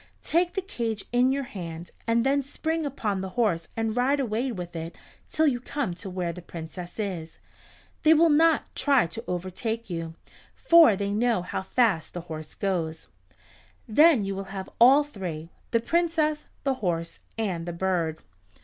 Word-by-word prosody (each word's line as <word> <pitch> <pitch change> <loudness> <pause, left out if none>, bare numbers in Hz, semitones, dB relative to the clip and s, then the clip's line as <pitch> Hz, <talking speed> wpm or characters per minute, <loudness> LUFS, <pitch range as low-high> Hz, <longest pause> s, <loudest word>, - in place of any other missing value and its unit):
Take 345 +2 +1
the 385 - -1
cage 230 - -3
in 250 +2 +4
your 275 +1 -1
hand 170 -7 -7 0.2
and 230 0 +2
then 280 +1 +3
spring 320 +3 -2
upon 210 -8 -2
the 190 - -4
horse 170 -9 +1
and 225 -1 -1
ride 265 +3 +2
away 245 0 -1
with 175 -5 -6
it 165 +1 -5 0.3
till 315 - +2
you 260 -5 +2
come 255 -5 -3
to 180 +3 -7
where 180 -2 -2
the 180 - -9
Princess 175 +3 -8
is. 175 -6 -4 0.6
They 315 +1 +6
will 325 +1 +5
not 320 +1 +3
try 275 -5 +3
to 230 +7 -7
overtake 190 +5 -3
you, 165 -1 -4 0.4
for 335 - +6
they 200 +1 -2
know 225 -2 +1
how 180 - -3
fast 195 -6 +1
the 175 - -3
horse 155 -2 -8
goes. 165 -5 -2 0.8
Then 275 -1 +5
you 195 - -2
will 195 0 -5
have 190 0 -7
all 270 +5 +8
three, 175 - -6 0.2
the 230 - +2
Princess, 320 +1 0 0.2
the 275 - +2
horse, 170 -3 -2 0.2
and 180 -7 -2
the - - -2
bird." 170 -3 -1
215 Hz, 170 wpm, -26 LUFS, 175-275 Hz, 0.8 s, all